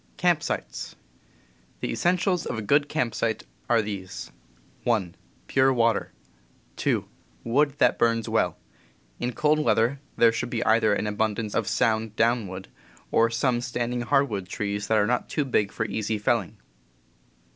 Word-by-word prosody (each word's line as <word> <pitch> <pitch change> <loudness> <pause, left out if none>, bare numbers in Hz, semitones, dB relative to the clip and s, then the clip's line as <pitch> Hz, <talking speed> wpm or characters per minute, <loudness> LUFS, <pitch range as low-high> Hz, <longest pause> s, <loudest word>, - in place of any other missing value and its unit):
P 180 - 0
<;,. 155 - -11 1.4
The - - -3
essentials 180 0 +1
of - - -3
a 110 - -3
good 145 +6 +3
camp 120 -3 -1
site 110 -1 -1
^ - - -23
* - - -35
are 115 -2 +4
these: 100 -3 -6 0.5
1. 105 -8 0 0.3
Pure 135 0 +3
water. 115 -2 +1 0.7
2. - - 0 0.4
Wood 140 +4 +2
that - - +3
burns 115 -1 +2
well. - - +1 0.6
In 125 - -1
cold 150 +4 +2
weather 120 0 +2 0.2
there 115 -1 +6
should 115 - -3
be 115 -1 -2
either 110 -2 +4
an - - -2
abundance 105 0 -1
of 115 - 0
sound 110 -2 +1
downwood 110 -5 0 0.4
or 115 0 +4
some 120 +1 +1
standing 120 0 -2
hardwood 120 -8 0
trees 100 0 -3
that 110 - +3
are 105 - +4
not 125 +3 -1
too 150 - 0
big 105 -6 +1
for 110 - -2
easy 110 0 -2
felling. 105 0 0
115 Hz, 155 wpm, -26 LUFS, 105-125 Hz, 1.4 s, there